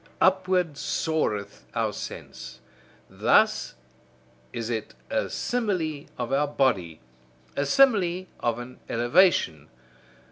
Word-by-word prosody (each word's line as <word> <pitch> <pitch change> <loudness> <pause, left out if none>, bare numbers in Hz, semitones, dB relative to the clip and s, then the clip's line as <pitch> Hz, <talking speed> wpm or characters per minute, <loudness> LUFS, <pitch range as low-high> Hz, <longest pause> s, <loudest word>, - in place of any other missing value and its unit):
Upward 185 -5 +2
soareth 105 -11 -2
our - - 0
sense: 65 - -8 0.5
thus - - +2 0.8
is 115 -1 -4
it 110 -2 -4 0.2
a - - 0
simile 180 -12 -1
of 120 +1 -3
our 145 +2 +2
body, 100 - 0 0.5
a 140 0 0
simile 185 - +4
of 120 -1 0
an 120 +1 -9
elevation. 120 - +3
140 Hz, 100 wpm, -26 LUFS, 115-180 Hz, 0.8 s, simile